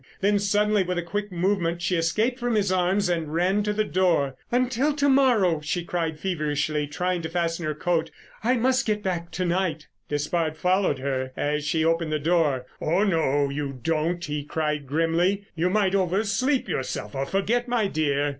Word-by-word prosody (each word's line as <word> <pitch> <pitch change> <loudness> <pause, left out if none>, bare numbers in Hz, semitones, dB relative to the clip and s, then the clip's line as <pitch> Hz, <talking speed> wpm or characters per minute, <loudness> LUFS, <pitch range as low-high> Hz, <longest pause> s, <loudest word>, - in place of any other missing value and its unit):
Then 205 +1 +2
suddenly 205 +1 +2
with 180 -1 -2
a 175 - -1
quick 205 +4 -4
movement 175 -1 0
she 180 +2 +1
escaped 215 +10 0
from 240 -2 0
his 200 -3 +1
arms 185 +2 +2
and 165 -4 -1
ran 180 +5 +2
to 210 0 0
the 215 +1 +1
door. 170 -9 +1 0.2
"Until 255 +4 +1
to 285 -1 +2
morrow," 240 - +3
she 170 +4 -2
cried 165 -3 -2
feverishly, 150 -4 -1
trying 180 +4 -1
to 160 - -4
fasten 170 -1 -1
her 155 - -2
coat. 165 0 0 0.3
"I 250 +3 +3
must 255 +2 +2
get 210 -1 0
back 175 -3 -2
to 185 - -1
night——" 170 -3 -1 0.2
Despard 155 +2 -1
followed 185 -4 +2
her 130 -1 -2
as 150 0 -1
she 160 +1 +1
opened 165 -1 +1
the 155 - +1
door. 150 -5 +1 0.2
"Oh, 175 +6 +2
no, 145 -7 +1
you 140 -1 -3
don't," 165 +5 -1
he 150 -1 -3
cried 150 -1 -2
grimly. 165 +7 +1
"You 170 +2 0
might 195 -1 +2
oversleep 200 +8 +1
yourself 105 -5 -3
or 135 0 -2
forget, 230 - 0
my 240 -3 +1
dear." 145 -5 0
175 Hz, 185 wpm, -25 LUFS, 155-200 Hz, 0.3 s, morrow